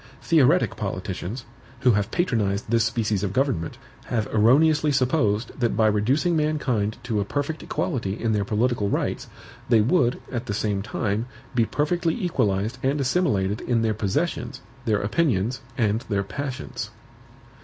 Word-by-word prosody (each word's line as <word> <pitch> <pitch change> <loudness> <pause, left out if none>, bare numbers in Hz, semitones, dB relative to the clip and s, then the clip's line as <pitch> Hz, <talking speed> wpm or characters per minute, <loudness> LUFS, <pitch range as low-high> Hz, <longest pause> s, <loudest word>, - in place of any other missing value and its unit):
Theoretic 165 +1 +3
politicians, 100 +3 -4 0.4
who 130 -2 +5
have 105 0 +1
patronized 110 - 0
this 115 -1 +4
species 110 -3 0
of 100 -2 -2
government, 130 - 0 0.3
have 110 -3 -1
erroneously 150 +8 +4
supposed 125 -5 +1
that 120 -4 +1
by 110 - +4
reducing 125 - +2
mankind 135 -9 0
to 115 -4 -1
a - - +1
perfect 145 +8 -3
equality 105 -5 -2
in 115 - 0
their 105 -1 +1
political 110 0 0
rights, - - -1 0.4
they 115 -2 +6
would, 125 +2 +2
at 120 -1 -3
the 105 - -2
same 105 -2 -1
time, 110 +2 -2 0.3
be 120 -3 +3
perfectly 165 +6 0
equalized 110 - 0
and 135 +3 +1
assimilated 120 - +1
in 115 -2 +1
their 110 -1 +2
possessions, 130 - -2 0.2
their 105 -3 +2
opinions, 115 - 0 0.2
and 110 -2 +1
their 100 -2 +1
passions. 125 - -5
115 Hz, 145 wpm, -24 LUFS, 105-140 Hz, 0.4 s, they